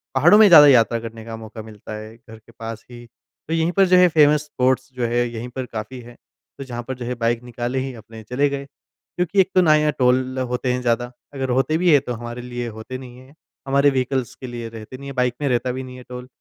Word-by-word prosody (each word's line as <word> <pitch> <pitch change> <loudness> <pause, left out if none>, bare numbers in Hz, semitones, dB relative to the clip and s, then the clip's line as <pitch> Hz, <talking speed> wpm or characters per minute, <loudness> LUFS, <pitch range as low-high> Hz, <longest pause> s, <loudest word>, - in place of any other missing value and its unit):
पहाड़ों 175 +10 +6
में 215 - +8
ज़्यादा 150 -6 +9
यात्रा 115 -3 +4
करने 115 -1 -9
का 115 -1 -6
मौका 110 0 -9
मिलता 110 0 -10
है, 110 +1 -10
घर 110 -2 -14
के 115 - -21
पास 115 -1 -7
ही। 120 0 -11 0.4
तो 160 - -2
यहीं 165 +1 +1
पर 195 +1 +4
जो 180 - +5
है 180 0 +7
फ़ेमस 150 -1 +4
स्पॉट्स 130 -2 0
जो 125 -2 -2
है 120 +1 0
यहीं 120 +1 -6
पर 130 -1 -3
काफ़ी 115 +2 -7
है, 120 0 -14 0.4
तो 140 - -6
जहाँ 120 -2 -6
पर 130 - -4
जो 120 -1 -7
है 125 +1 -3
बाइक 115 +1 -1
निकाले 120 +2 -3
ही 130 0 -4
अपने 110 0 -12
चले 140 +5 0
गए। 140 0 -5
क्योंकि 180 +6 -5
एक 185 - 0
तो 185 - +6
ना 155 -3 +5
यहाँ 150 0 +2
टोल 130 +1 +2
होते 125 0 -1
हैं 125 - -2
ज़्यादा, 120 0 0 0.2
अगर 135 -2 -3
होते 135 +5 +1
भी 175 0 +3
है 145 - +7
तो 125 - -5
हमारे 120 +1 -7
लिए 120 -1 -5
होते 110 +3 -7
नहीं 125 -1 -11
है। 130 +2 -16 0.3
हमारे 140 +1 +4
वीइकल्स 130 -2 -1
के 130 - -9
लिए 120 -1 -6
रहते 115 +3 -10
नहीं 140 0 -9
है, - - -7
बाइक 125 -1 +1
में 140 - 0
रहता 125 +1 0
भी 130 +1 -5
नहीं 130 0 -10
है 125 - -11
टोल। 125 0 -8
125 Hz, 255 wpm, -21 LUFS, 120-140 Hz, 0.4 s, ज़्यादा